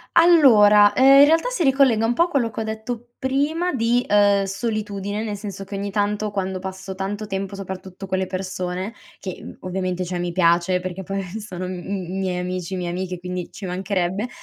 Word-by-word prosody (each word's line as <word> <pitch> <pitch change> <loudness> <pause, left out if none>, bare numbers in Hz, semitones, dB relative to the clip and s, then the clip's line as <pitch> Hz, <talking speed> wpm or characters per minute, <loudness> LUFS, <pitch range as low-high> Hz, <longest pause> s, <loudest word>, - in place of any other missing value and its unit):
Allora, 215 -12 +7
uhm, 260 - +3 0.2
in - - +9
realtà 325 +10 +3
si 455 -9 -1
ricollega 265 -5 +4
un 230 - +2
po' 335 - +4
a - - 0
quello 260 -9 0
che 220 - -4
ho - - -1
detto 225 +2 -6
prima 290 +6 0
di, 240 0 +1
uhm, 205 -1 +4
solitudine, 205 0 -3
nel 210 -2 -3
senso 200 -1 -7
che 195 +1 -7
ogni 200 +1 -3
tanto 210 +1 -1
quando 190 -2 -3
passo 190 0 -6
tanto 195 +3 -4
tempo, 195 0 -4
soprattutto 190 0 -7
con 190 0 -1
le 190 - -1
persone, 185 +1 -4 0.3
che, 185 -2 -6
mhmm, - - -9
ovviamente 185 0 -3
cioè 180 0 -4
mi 175 0 -2
piace 175 +1 +2
perché 185 +1 -5
poi 195 +1 -4 0.2
sono 185 -4 -6
m 185 - -4
m 190 -1 -4
miei 185 -2 -1
amici, 180 0 -3
mie 180 -1 -3
amiche, 180 +1 -4
quindi 180 0 -5
ci 220 - -8
mancherebbe, 190 +3 -2
195 Hz, 200 wpm, -22 LUFS, 185-220 Hz, 0.3 s, in